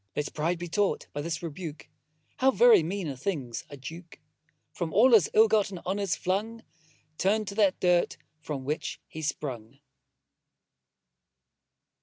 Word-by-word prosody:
Let 150 - -3
pride 165 +3 0
be 175 +1 -6
taught 200 +4 0
by 145 - -3
this 165 +1 -4
rebuke, 160 -1 -7 0.5
How 265 - +4
very 245 -6 +6
mean 180 +2 -3
a 140 - -4
thing's 130 -5 -4
a 145 - -9
Duke; 165 +6 -10 0.5
From 170 -3 -4
all 235 +10 +5
his 215 -10 +6
ill 220 +1 +7
got 210 -2 +2
honours 190 +1 -2
flung, 220 +5 -2 0.6
Turn'd 210 +3 +1
to 200 - -7
that 195 -2 +3
dirt 180 -1 +2 0.2
from 140 -4 -5
whence 150 +3 -3
he 160 - -8
sprung. 135 -5 -4
175 Hz, 145 wpm, -28 LUFS, 150-200 Hz, 0.6 s, ill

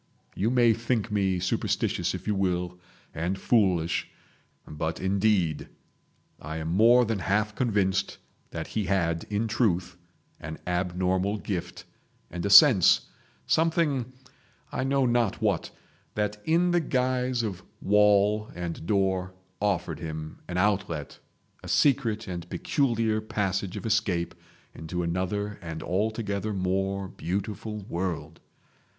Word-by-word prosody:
You 105 +4 0
may 120 -2 +4
think 115 -1 -1
me 95 -3 +1
superstitious 90 +1 -1
if - - -8
you 105 - +1
will, 90 -2 -1 0.3
and 90 +4 -2
foolish; 95 -6 +1 0.6
but, 80 +2 -3
indeed, 95 -5 +1 0.7
I 80 +2 -6
am 80 0 -4
more 115 +7 +5
than 110 -2 -1
half 105 +3 0
convinced 100 -5 0 0.3
that - - -5
he 105 -2 -2
had 85 -3 0
in 105 +2 0
truth, 95 -6 0 0.4
an 80 +1 -7
abnormal 90 +3 0
gift, 90 -4 -5 0.5
and 90 -1 -4
a 100 - 0
sense, 105 - +7 0.4
something—I 135 -7 -2
know 135 0 +2
not 120 -4 +1
what—that 105 0 -3
in 170 +2 +3
the 175 0 +3
guise 125 -3 0
of 95 -5 -4 0.2
wall 105 +1 +3
and 85 -2 -5
door 95 -2 0 0.3
offered 100 -4 -1
him 80 -1 -6
an 90 - -4
outlet, 90 -6 -1 0.4
a - - -10
secret 115 -6 +2
and 85 -2 -6
peculiar 115 -5 0
passage 100 -4 -2
of - - -7
escape 100 -6 0 0.4
into 90 +2 -4
another 95 +4 -2
and 80 -2 -6
altogether 105 +2 -1
more 95 +1 -1
beautiful 105 +4 -4
world. 90 -2 -4
100 Hz, 120 wpm, -27 LUFS, 90-110 Hz, 0.7 s, sense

